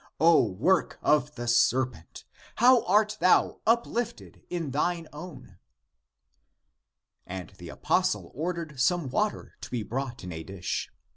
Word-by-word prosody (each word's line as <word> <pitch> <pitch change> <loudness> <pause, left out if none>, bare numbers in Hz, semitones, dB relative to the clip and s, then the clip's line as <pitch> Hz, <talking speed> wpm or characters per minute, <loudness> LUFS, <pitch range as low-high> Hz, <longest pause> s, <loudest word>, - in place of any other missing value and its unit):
O 165 -2 +6
work 135 - +1
of 150 0 +2
the 120 -1 -5
serpent, 120 -6 +1 0.3
how 245 +1 +5
art 210 +2 +2
thou 185 - +3
uplifted 235 0 -1
in 165 -5 -3
thine 165 +4 -1
own!" 145 - -11 1.7
And 90 -2 -7
the - - -9
apostle - - 0
ordered 160 -2 -4
some 150 +3 +1
water 210 +10 -2
to - - -8
be 120 -3 -3
brought 125 +1 -5
in 90 - -6
a 80 -1 -6
dish. 95 0 -4
150 Hz, 130 wpm, -27 LUFS, 120-180 Hz, 1.7 s, O